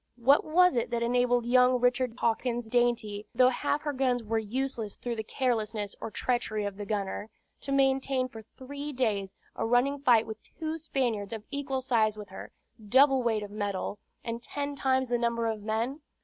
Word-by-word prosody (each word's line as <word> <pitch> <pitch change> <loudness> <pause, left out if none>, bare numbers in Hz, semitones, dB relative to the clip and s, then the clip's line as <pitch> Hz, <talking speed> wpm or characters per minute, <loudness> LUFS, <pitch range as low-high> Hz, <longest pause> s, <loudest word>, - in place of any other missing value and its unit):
What 265 +4 +5
was 360 +1 +4
it 235 - 0
that 235 -1 -1
enabled 245 0 +2
young 250 +1 +4
Richard 245 -1 +1
Hawkins' 235 +1 0
Dainty, 225 -3 0
though 255 0 +6
half 285 +3 -1
her 295 -1 -2
guns 255 -3 +1
were 225 +1 0
useless 230 -1 -3
through 240 -1 -4
the 220 - -3
carelessness 220 -4 -1
or - - -4
treachery 215 -3 -1
of 200 -1 -4
the 205 -1 -6
gunner, 205 0 -3 0.3
to 275 - -6
maintain 270 -1 +2
for 225 -3 -10
three 280 +6 -8
days 210 -7 -1 0.2
a - - -2
running 245 +5 +2
fight 240 -5 +4
with 220 -1 -8
two 320 0 -5
Spaniards 240 -9 -2
of 220 -2 -6
equal 275 -2 -2
size 225 -5 +2
with 210 -2 -8
her, 190 - -9 0.3
double 265 +5 +5
weight 225 -3 0
of 205 - -8
metal, 205 -1 -3 0.2
and 230 0 -4
ten 285 +3 -4
times 260 -1 +1
the 240 0 0
number 235 -1 0
of 220 -2 -2
men? 225 +7 -2
240 Hz, 185 wpm, -29 LUFS, 220-265 Hz, 0.3 s, though